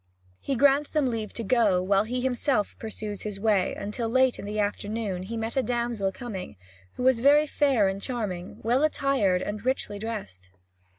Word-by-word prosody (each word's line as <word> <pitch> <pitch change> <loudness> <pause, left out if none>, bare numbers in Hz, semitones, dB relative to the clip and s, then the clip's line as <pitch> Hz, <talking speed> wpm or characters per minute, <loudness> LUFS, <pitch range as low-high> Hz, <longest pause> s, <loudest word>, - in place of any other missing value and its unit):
He 275 - -2
grants 280 +3 +4
them 290 -5 +1
leave 220 -3 -4
to 230 - -4
go, 215 -4 +3
while 195 +2 +2
he 250 +2 -2
himself 250 -3 0
pursues 215 -2 -6
his 210 -2 -5
way, 205 -3 +2
until 225 +3 -3
late 260 +1 +3
in - - -6
the 210 +1 -4
afternoon 205 -1 -2
he 220 +5 -5
met 225 +1 -3
a 265 - +3
damsel 235 -5 -1
coming, 195 - -7 0.4
who - - -5
was 260 -2 +4
very 290 +3 +6
fair 275 -8 +2
and 195 +1 -3
charming, 200 -8 -4
well 240 +4 +2
attired 270 -11 +2
and 205 0 -5
richly 250 -5 -1
dressed. 200 - -6
225 Hz, 180 wpm, -27 LUFS, 200-255 Hz, 0.4 s, very